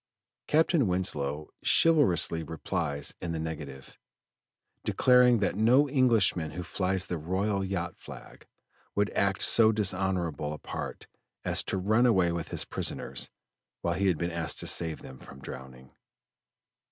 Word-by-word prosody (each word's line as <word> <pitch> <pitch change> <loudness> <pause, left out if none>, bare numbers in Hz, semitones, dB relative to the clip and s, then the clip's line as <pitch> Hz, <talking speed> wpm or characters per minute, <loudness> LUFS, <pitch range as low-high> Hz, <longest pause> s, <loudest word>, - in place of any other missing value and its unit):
Captain 155 - +2
Winslow 75 -5 -1
chivalrously 140 - +3
replies 80 -2 -3
in 85 -1 -4
the 80 - -3
negative, 75 -4 -8 0.8
declaring 125 -1 +4
that 100 -4 0
no 125 +7 +4
Englishman 115 - +2
who 90 - -6
flies 95 0 -1
the 90 -3 -4
royal 95 +5 -1
yacht 90 -3 -4
flag, - - -13 0.5
would 105 +1 0
act 100 -1 0
so 110 -1 +6
dishonorable 95 -7 -1
a - - -7
part - - -7 0.4
as - - +3
to - - -4
run 110 +6 +2
away 95 -7 +3
with 85 -1 -4
his - - -1
prisoners - - -2 0.5
when 85 +1 -2
he 100 - +1
had 90 -4 +2
been 85 +2 -3
asked 85 -1 -1
to - - -2
save 80 -2 +1
them 65 -1 -11
from 70 - -13
drowning. 65 -1 -11
90 Hz, 140 wpm, -28 LUFS, 80-105 Hz, 0.8 s, so